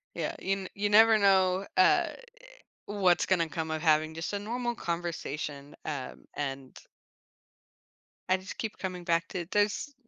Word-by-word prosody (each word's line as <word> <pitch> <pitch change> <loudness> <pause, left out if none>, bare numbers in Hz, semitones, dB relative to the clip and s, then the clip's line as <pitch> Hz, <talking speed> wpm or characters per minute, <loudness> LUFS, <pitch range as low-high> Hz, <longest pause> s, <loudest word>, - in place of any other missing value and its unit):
Yeah, - - -2
you 195 - -1
n 195 -1 -2
you 205 +1 -1
never 220 +1 +7
know, 190 -1 +3
uh, 185 0 +5 0.8
what's 195 -4 +2
gonna 170 -3 +2
come 160 0 -4
of 155 - -2
having 155 -1 +3
just 165 +5 -4
a 205 - -1
normal 240 +3 -3
conversation, 155 -5 -4
um, 140 -4 -5
and 135 -2 -5 1.5
I 185 - +4
just 190 +1 -9
keep 220 -2 -4
coming 180 -2 -5
back 165 -1 +1
to 175 -2 -4
there's 210 +7 0
185 Hz, 150 wpm, -29 LUFS, 160-200 Hz, 1.5 s, never